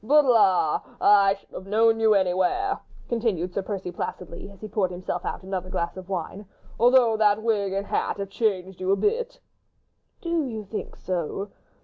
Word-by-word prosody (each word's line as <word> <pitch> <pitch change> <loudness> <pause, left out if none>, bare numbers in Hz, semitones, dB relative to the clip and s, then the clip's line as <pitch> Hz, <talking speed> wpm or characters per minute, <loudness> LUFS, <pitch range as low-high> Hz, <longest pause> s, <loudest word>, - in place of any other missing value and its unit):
"But, 295 +5 +5
la! 190 - +4 0.2
I 200 -1 +5
should 200 - -24
have 190 - -8
known 225 +2 +3
you 220 -1 +4
anywhere," 190 - +1 0.3
continued 210 -7 -1
Sir 200 - -1
Percy, 190 -2 -5
placidly, 180 +2 -6
as 200 - -16
he 215 - -7
poured 205 -3 0
himself 180 0 -4
out - - -4
another 185 -1 -4
glass 170 -2 -2
of 185 0 -10
wine, 190 +2 -4 0.3
"although 240 -1 +5
the 210 -1 +3
wig 215 -3 0
and 195 +1 -2
hat - - -1
have 200 -1 -4
changed 190 -5 -1
you 185 - -2
a - - +5
bit." 475 - -1 0.8
"Do 335 -4 -1
you 220 -3 -5
think 210 +2 -6
so?" 185 +3 -4
200 Hz, 180 wpm, -25 LUFS, 185-225 Hz, 0.8 s, But